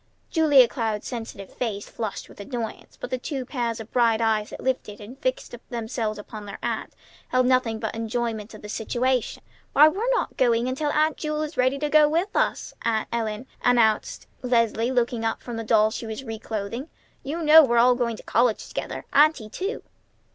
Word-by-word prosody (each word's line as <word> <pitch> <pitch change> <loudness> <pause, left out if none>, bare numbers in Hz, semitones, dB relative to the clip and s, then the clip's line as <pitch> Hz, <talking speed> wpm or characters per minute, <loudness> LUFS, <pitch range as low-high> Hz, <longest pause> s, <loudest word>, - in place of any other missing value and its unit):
Julia 290 -6 +6
Cloud's 220 -4 -3
sensitive 225 -5 -7
face 210 -5 -3
flushed 220 -3 -5
with - - -16
annoyance, 230 +1 -6
but - - -6
the 255 - -1
two 270 -1 -4
pairs 240 -4 -2
of 225 0 -9
bright 230 -3 +3
eyes 220 -2 +1
that - - -9
lifted 255 -5 -2
and 215 +4 -10
fixed 255 -4 -2 0.2
themselves 230 -2 -3
upon 210 0 -9
their 200 - -7
aunt - - -3 0.3
held 255 0 +2
nothing 250 -3 +2
but 220 0 -4
enjoyment 225 -1 -3
of 215 - -13
the - - -7
situation. 245 +3 -1 0.3
"Why, 300 +2 +8
we're 410 +10 0
not - - -2
going 240 -1 +3
until 275 +4 -1
Aunt 305 +1 +2
Jewel 305 0 -2
is 305 +1 -6
ready 255 +1 +2
to 300 +1 -1
go 300 0 +5
with 345 +6 -1
us, - - 0
Aunt 220 -2 0
Ellen," 220 0 -2 0.2
announced 230 -3 +2 0.2
Leslie, 230 -2 +1
looking 240 -2 0
up 225 - -2
from 240 -2 -6
the 225 - -3
doll 215 -1 +3
she 230 - -5
was 220 +4 -5
reclothing. 225 +3 -5 0.3
"You 320 +5 -4
know 315 +1 +9
we're 240 -4 +2
all 245 +2 +6
going 240 -2 -1
to - - -12
college 235 -2 +1
together, - - -5
Auntie, 295 -7 +4
too!" 390 - -4
240 Hz, 190 wpm, -25 LUFS, 220-265 Hz, 0.3 s, know